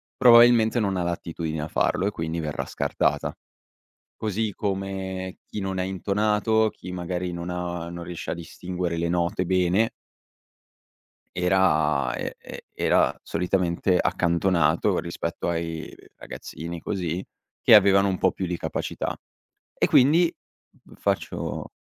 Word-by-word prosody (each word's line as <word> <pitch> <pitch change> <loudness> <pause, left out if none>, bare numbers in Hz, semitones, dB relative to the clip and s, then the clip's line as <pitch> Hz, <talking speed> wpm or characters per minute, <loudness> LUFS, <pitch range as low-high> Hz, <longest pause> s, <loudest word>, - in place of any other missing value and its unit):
probabilmente 120 -1 +6
non 100 -3 0
ha 90 - 0
l'attitudine 85 -2 -3
a 75 - -3
farlo 90 - +1
e 100 - +1
quindi 80 -2 -3
verrà 75 -2 -3
scartata. 70 - -1 0.8
Così 110 0 -2
come 95 -2 -4
chi - - -7
non 95 -1 -3
è - - +1
intonato, 105 +3 +1
chi 90 - -10
magari 90 0 -3
non 85 +1 -5
ha 90 -1 -4
non 85 0 -7
riesce 85 -1 -6
a - - -1
distinguere 90 +1 -4
le 85 - 0
note 85 +1 0
bene 95 +4 +2 1.5
era 85 -6 +2
e - - -4
e - - -9
era - - +2
solitamente 90 0 0
accantonato, 85 -2 +2
rispetto - - -3
ai 80 -1 -4 0.2
ragazzini, 85 +1 -7
così, 90 -2 -3 0.4
che - - +6
avevano 100 -1 +6
un 95 - 0
po' 95 0 +2
più 95 - -3
di 90 0 -2
capacità. - - -3 0.6
E - - +2
quindi 160 +7 +5 0.7
faccio - - -2
90 Hz, 130 wpm, -25 LUFS, 85-100 Hz, 1.5 s, probabilmente